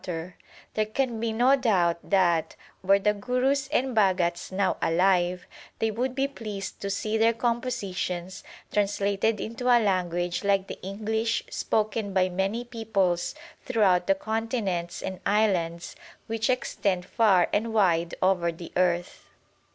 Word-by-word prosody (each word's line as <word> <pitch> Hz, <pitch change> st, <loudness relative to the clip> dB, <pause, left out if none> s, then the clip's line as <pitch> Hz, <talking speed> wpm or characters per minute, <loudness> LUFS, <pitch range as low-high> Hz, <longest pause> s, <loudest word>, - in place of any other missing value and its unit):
PREFACE 170 Hz, -1 st, -4 dB
ix -, -, -27 dB, 0.4 s
There 215 Hz, -, +1 dB
can 235 Hz, 0 st, -1 dB
be 230 Hz, 0 st, -1 dB
no 245 Hz, +5 st, +4 dB
doubt 180 Hz, -10 st, +1 dB
that, 175 Hz, -5 st, +2 dB, 0.3 s
were 195 Hz, +1 st, +4 dB
the 210 Hz, +1 st, +2 dB
Gurus 250 Hz, +6 st, 0 dB
and 265 Hz, -3 st, 0 dB
Bha 200 Hz, -4 st, +4 dB
gats 175 Hz, -1 st, -2 dB
now 190 Hz, 0 st, 0 dB
alive, 180 Hz, +1 st, +2 dB, 0.3 s
they 225 Hz, 0 st, 0 dB
would 250 Hz, +4 st, -2 dB
be 270 Hz, +1 st, +1 dB
pleased 215 Hz, -7 st, -7 dB
to 200 Hz, -, -3 dB
see 215 Hz, +2 st, -1 dB
their 225 Hz, +1 st, +4 dB
com 235 Hz, 0 st, 0 dB
positions 185 Hz, -6 st, -4 dB, 0.3 s
translated 205 Hz, +1 st, +1 dB
into 230 Hz, +3 st, -5 dB
a 245 Hz, -1 st, +7 dB
language 175 Hz, -4 st, 0 dB
like 195 Hz, -1 st, +2 dB
the -, -, -9 dB
English 220 Hz, +4 st, -1 dB
spoken 215 Hz, -2 st, -1 dB
by 185 Hz, -1 st, +2 dB
many 195 Hz, +6 st, -1 dB
peoples 200 Hz, -7 st, -1 dB, 0.3 s
throughout 195 Hz, -8 st, +2 dB
the 195 Hz, -, +4 dB
continents 220 Hz, -5 st, -2 dB
and 190 Hz, -1 st, -5 dB
islands 180 Hz, -5 st, 0 dB, 0.3 s
which 225 Hz, +2 st, -2 dB
extend 205 Hz, -8 st, 0 dB
far 190 Hz, -3 st, +3 dB
and 225 Hz, +2 st, 0 dB
wide 175 Hz, -6 st, +2 dB
over 180 Hz, -2 st, +2 dB
the 165 Hz, 0 st, -10 dB
earth. 175 Hz, -1 st, 0 dB
200 Hz, 150 wpm, -26 LUFS, 180-225 Hz, 0.4 s, a